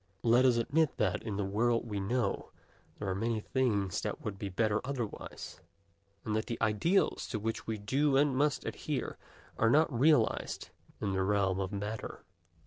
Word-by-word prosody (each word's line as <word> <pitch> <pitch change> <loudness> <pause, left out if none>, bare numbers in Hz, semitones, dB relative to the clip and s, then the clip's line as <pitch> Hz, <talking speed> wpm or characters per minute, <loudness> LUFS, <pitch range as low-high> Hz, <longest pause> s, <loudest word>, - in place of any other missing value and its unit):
Let 120 +2 +5
us 125 -2 +5
admit 145 +6 +1
that, - - +1
in 105 -4 -4
the 100 - 0
world 115 +4 +1
we 105 -2 -3
know 100 +1 -1 0.5
there 105 - -5
are 95 - 0
many 110 +3 -1
things 105 -6 0
that - - -3
would 100 -3 -4
be 100 - -3
better 105 +2 +1
otherwise, 125 -5 -5 0.6
and 105 - -1
that 110 - -1
the 115 - -3
ideals 110 - +2
to 110 - -3
which 110 +1 -3
we 110 -1 -2
do 135 +7 +2
and 140 -1 +3
must 145 +1 +1
adhere - - -3 0.4
are 115 - +4
not 155 +3 +4
realized 125 -1 +2 0.3
in 100 - -1
the 95 - +1
realm 95 -1 +1
of 95 0 -2
matter. 105 +2 -5
110 Hz, 175 wpm, -32 LUFS, 100-130 Hz, 0.6 s, Let